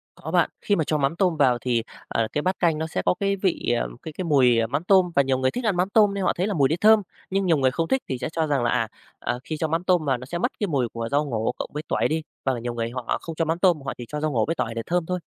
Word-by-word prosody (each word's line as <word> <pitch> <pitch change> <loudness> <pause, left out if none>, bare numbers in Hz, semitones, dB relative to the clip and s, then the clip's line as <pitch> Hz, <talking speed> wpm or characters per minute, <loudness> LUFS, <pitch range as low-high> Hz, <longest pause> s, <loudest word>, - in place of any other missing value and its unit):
Có - - -7
bạn. - - +3
Khi 205 - +1
mà 160 - +1
cho 155 +1 0
mắm 140 +2 0
tôm 175 -2 +1
vào 130 -4 +4
thì, 120 -2 0 0.3
à, 115 - 0
cái 150 - 0
bát 185 +4 -1
canh 165 -3 +2
nó 160 +1 -2
sẽ - - -2
có - - +4
cái 200 0 +1
vị, 185 -10 0
à, - - 0 0.2
cái 160 - -7
cái 185 +4 -4
mùi, 130 -7 +4
à, 115 - +1
mắm 140 +7 -2
tôm 185 -1 +4
và 140 - +6
nhiều 135 -1 +1
người 130 0 +1
thích 250 - -4
ăn 210 -4 +2
mắm 180 +2 +1
tôm 205 -1 +4
nên 200 -1 -2
họ - - +2
thấy 180 +3 -1
là 210 - -1
mùi 140 -6 +3
đấy 160 - 0
thơm, 215 0 +6 0.3
nhưng 195 0 0
nhiều 165 -4 +3
người 130 -2 +2
không 165 +4 -1
thích 265 +6 +1
thì 130 - -1
sẽ - - -2
cho 160 0 -1
rằng 140 -4 +1
là, 120 - +2
à, 115 -3 +1 0.3
à, 120 +1 -2
khi 155 - -4
cho 160 - -1
mắm 165 +2 -1
tôm 180 -4 +2
vào 135 -3 +1
nó 130 - -9
sẽ 170 +6 -4
mất 170 - 0
cái 205 - 0
mùi 135 -7 0
của 115 0 -4
rau 145 +2 +2
ngổ 115 -3 -1
cộng - - -4
với 150 +1 -4
tỏi - - +1
đi, 160 +1 -1 0.2
hoặc 135 - +2
là 120 - -4
nhiều 120 +1 -4
người 115 -1 -2
họ 125 0 -2
không 165 - -7
cho 165 - 0
mắm 165 +2 -1
tôm, 175 -5 +3
họ 135 -1 -4
chỉ 120 - -7
cho 150 - -4
rau 155 0 0
ngổ 115 -5 +1
với 165 - -1
tỏi 115 - -2
để 115 - -2
thơm 175 -1 0
thôi. 180 +2 -2
155 Hz, 340 wpm, -24 LUFS, 130-180 Hz, 0.3 s, và